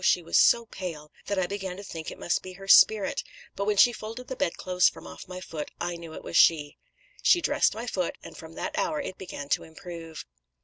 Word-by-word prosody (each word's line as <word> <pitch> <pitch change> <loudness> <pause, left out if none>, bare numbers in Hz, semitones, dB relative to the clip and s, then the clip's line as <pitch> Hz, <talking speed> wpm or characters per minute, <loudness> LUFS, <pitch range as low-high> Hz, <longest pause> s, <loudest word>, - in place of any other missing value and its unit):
she 180 - +3
was 165 - -3
so 235 -1 +6
pale 165 -8 -7 0.2
that 200 - -1
I 185 - +2
began 190 -1 -5
to 200 - -8
think 165 -5 -6
it - - -9
must 175 - 0
be 185 - -9
her 195 +1 -11
spirit 205 0 +5 0.3
but 200 - -2
when 210 0 +1
she 240 +4 +7
folded 225 +3 -8
the 260 - -3
bedclothes 180 -3 +2
from - - -13
off 80 0 -10
my 180 0 -7
foot, 160 -4 -6
I 175 0 -2
knew 170 -1 -9
it - - -9
was - - -6
she. 150 -4 +4 0.4
She 355 - +5
dressed 290 -9 +2
my 230 +2 -5
foot, 185 -7 -2
and - - -10
from 160 0 -11
that 310 0 -3
hour 310 - 0
it 235 -10 -6
began 145 -6 -7
to - - +1
improve.' 165 0 -9
185 Hz, 230 wpm, -27 LUFS, 165-210 Hz, 0.4 s, she